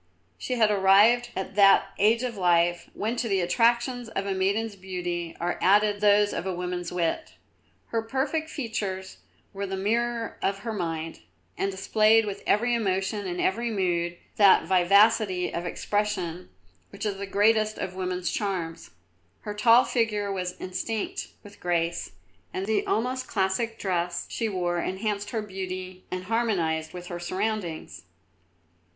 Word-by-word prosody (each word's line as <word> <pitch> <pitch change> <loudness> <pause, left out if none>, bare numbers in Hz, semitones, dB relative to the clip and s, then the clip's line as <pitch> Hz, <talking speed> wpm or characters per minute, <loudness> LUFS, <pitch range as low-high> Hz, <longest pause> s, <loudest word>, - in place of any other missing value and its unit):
She 255 - -2
had 220 -3 +3
arrived 210 +5 +5
at 190 0 -4
that 195 -1 +5
age 225 +4 +4
of 245 -2 -3
life, 175 -2 +2
when 220 +3 -2
to 235 - -1
the 195 -1 +2
attractions 235 +5 +1
of 195 -2 -3
a 200 - -1
maiden's 200 +3 0
beauty 180 -3 -4
are 175 +1 -2
added 205 +1 +3
those 205 0 +4
of 175 - -3
a 185 - -2
woman's 180 0 -4
wit. 180 - -2 0.5
Her 230 - 0
perfect 275 +7 -2
features 205 -9 -4 0.4
were 200 0 -4
the 190 0 -3
mirror 230 +3 -1
of 195 0 -1
her 225 - -2
mind, 165 -4 -4 0.4
and 195 - -1
displayed 215 +3 +3
with 200 -1 -5
every 240 +4 +2
emotion 200 -2 -1
and 175 0 -4
every 235 +5 0
mood 175 -4 -1 0.2
that 200 -2 +6
vivacity 190 +1 +3
of 170 +1 -3
expression 185 -4 -2 0.4
which - - -7
is 200 -2 -2
the 200 0 -5
greatest 215 +2 +2
of 185 - -4
woman's 185 -1 -2
charms. 180 -5 -3 0.5
Her 210 - -5
tall 230 +4 +6
figure 210 -4 0
was 180 -2 -4
instinct 205 +4 -3 0.2
with 205 0 -14
grace, 170 -1 -1 0.4
and 190 - -3
the 215 0 0
almost 255 +3 -1
classic 205 +3 -1
dress 175 -2 -2
she 225 -2 -2
wore 175 -3 -1
enhanced 205 +3 -2
her 220 -2 -2
beauty 185 -2 -6
and 185 0 -4
harmonised 185 -8 0
with 180 -1 -8
her 175 -1 -6
surroundings. 185 -1 -3
195 Hz, 150 wpm, -26 LUFS, 180-220 Hz, 0.5 s, that